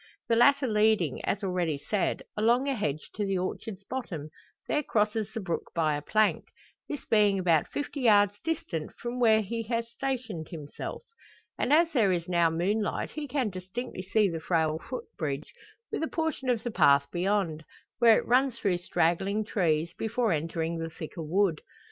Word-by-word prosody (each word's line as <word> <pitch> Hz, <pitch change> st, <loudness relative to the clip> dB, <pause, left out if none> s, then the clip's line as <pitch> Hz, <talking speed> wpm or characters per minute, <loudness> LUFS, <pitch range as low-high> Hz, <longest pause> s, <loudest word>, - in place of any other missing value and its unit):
The 230 Hz, -, +4 dB
latter 280 Hz, +4 st, +5 dB
leading, 215 Hz, -, +2 dB
as 205 Hz, +1 st, -1 dB
already 180 Hz, -5 st, 0 dB
said, 195 Hz, +7 st, -1 dB
along 235 Hz, +5 st, +3 dB
a 275 Hz, -, +1 dB
hedge 155 Hz, -, -3 dB
to 210 Hz, -, -2 dB
the 195 Hz, -1 st, 0 dB
orchard's 190 Hz, +2 st, -4 dB
bottom, 190 Hz, -, -5 dB, 0.4 s
there 300 Hz, -, +1 dB
crosses 215 Hz, -4 st, 0 dB
the 225 Hz, -, -4 dB
brook 180 Hz, -5 st, -3 dB
by 155 Hz, -3 st, +2 dB
a 145 Hz, -, -3 dB
plank 215 Hz, +7 st, +2 dB, 0.4 s
this 290 Hz, -, -5 dB
being 210 Hz, -3 st, +4 dB
about 170 Hz, -5 st, +2 dB
fifty 290 Hz, 0 st, -4 dB
yards 205 Hz, -3 st, +4 dB
distant 200 Hz, -, -3 dB
from 240 Hz, +1 st, -5 dB
where 220 Hz, -2 st, +5 dB
he 230 Hz, +3 st, -3 dB
has 230 Hz, 0 st, -2 dB
stationed 240 Hz, -11 st, -3 dB
himself. 150 Hz, -, -7 dB, 0.5 s
And -, -, -1 dB
as 330 Hz, +2 st, +5 dB
there 220 Hz, -, +3 dB
is 170 Hz, -1 st, -1 dB
now 170 Hz, -2 st, +3 dB
moonlight 200 Hz, +6 st, -1 dB
he 305 Hz, -1 st, -5 dB
can 260 Hz, -6 st, -1 dB
distinctly 185 Hz, +4 st, -6 dB
see 200 Hz, +3 st, +2 dB
the 165 Hz, -3 st, -3 dB
frail 160 Hz, -1 st, 0 dB
footbridge, 155 Hz, -, -5 dB, 0.4 s
with -, -, -2 dB
a 320 Hz, -, 0 dB
portion 320 Hz, -6 st, -2 dB
of 235 Hz, -3 st, +1 dB
the 240 Hz, -, -3 dB
path 140 Hz, -8 st, +5 dB
beyond, 175 Hz, -3 st, 0 dB, 0.4 s
where 230 Hz, -2 st, +7 dB
it -, -, -2 dB
runs 255 Hz, 0 st, +3 dB
through 185 Hz, -6 st, 0 dB
straggling 190 Hz, +4 st, 0 dB
trees, 170 Hz, -5 st, 0 dB
before 225 Hz, 0 st, 0 dB
entering 165 Hz, +1 st, -1 dB
the 165 Hz, 0 st, -3 dB
thicker 165 Hz, +1 st, -8 dB
wood. 170 Hz, 0 st, +1 dB
205 Hz, 175 wpm, -28 LUFS, 170-235 Hz, 0.5 s, where